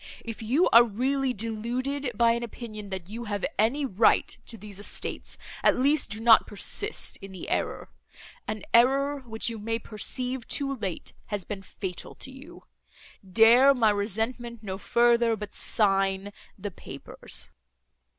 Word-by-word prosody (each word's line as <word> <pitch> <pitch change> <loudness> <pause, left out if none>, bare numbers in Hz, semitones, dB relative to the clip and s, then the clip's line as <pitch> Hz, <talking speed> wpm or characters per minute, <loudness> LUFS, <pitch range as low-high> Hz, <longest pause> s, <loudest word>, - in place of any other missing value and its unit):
—If 230 -1 -6
you 260 +11 +2
are 235 +1 +8
really 260 +4 0
deluded 245 +5 -2
by 235 +1 +4
an 235 0 -1
opinion, 215 -3 -7
that 190 -3 -5
you 230 +4 -6
have 205 -2 -2
any 260 +7 +2
right 220 -3 +3
to 225 - -4
these 205 -2 -10
estates, 205 - -1 0.2
at - - +4
least, 280 +3 +3
do 215 - -4
not 225 0 +6
persist 410 - -3
in 195 - -11
the 190 - -8
error—an 215 - -5
error, 275 +4 +4
which 225 -4 -3
you 225 - -6
may 225 +2 -2
perceive, 250 +3 -3
too 275 -1 -1
late, 195 -8 -5
has 205 -4 -4
been 200 -2 -6
fatal 190 -1 -7
to 265 - -9
you. 295 +7 -13 0.7
Dare 240 +7 +7
my 225 -4 +4
resentment 225 +3 -1
no 190 -2 -5
further, 235 0 +3
but 210 -1 -8
sign 195 -1 +1 0.2
the 205 +1 -5
papers." - - -8
230 Hz, 150 wpm, -27 LUFS, 205-255 Hz, 0.7 s, are